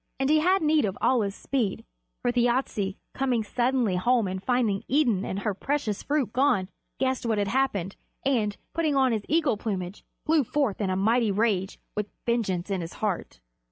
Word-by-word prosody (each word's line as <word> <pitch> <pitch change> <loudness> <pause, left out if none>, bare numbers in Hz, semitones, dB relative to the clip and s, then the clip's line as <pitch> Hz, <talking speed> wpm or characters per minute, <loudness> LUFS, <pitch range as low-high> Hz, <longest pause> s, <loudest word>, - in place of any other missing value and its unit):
And 270 +2 +2
he 310 - +5
had 365 +3 +3
need 310 -1 +3
of 195 -2 -3
all 255 -2 +3
his 200 -1 -2
speed, 240 -8 -2 0.4
for 245 - +2
Thjasse, 240 -5 0 0.2
coming 255 -4 0
suddenly 240 -3 +1
home 235 +2 +2
and 185 0 -4
finding 230 -3 +1
Idun 245 -9 +2
and 190 - -3
her 210 0 0
precious 230 -1 -2
fruit 285 -6 -1
gone, 245 -8 +2 0.3
guessed 260 -1 0
what 225 -2 0
had 200 -1 0
happened, 210 -7 0 0.3
and, 220 -7 +1 0.2
putting 315 -3 +1
on 265 -2 +4
his 220 -2 0
eagle 310 -8 +2
plumage, 195 -3 -4 0.2
flew 310 -2 +4
forth 260 -5 -1
in 195 - 0
a 185 - 0
mighty 225 +4 +2
rage, 200 -2 0 0.2
with 210 0 -2 0.2
vengeance 200 -6 0
in 190 -2 0
his 165 +1 -6
heart. 190 - -3
230 Hz, 185 wpm, -27 LUFS, 200-265 Hz, 0.4 s, he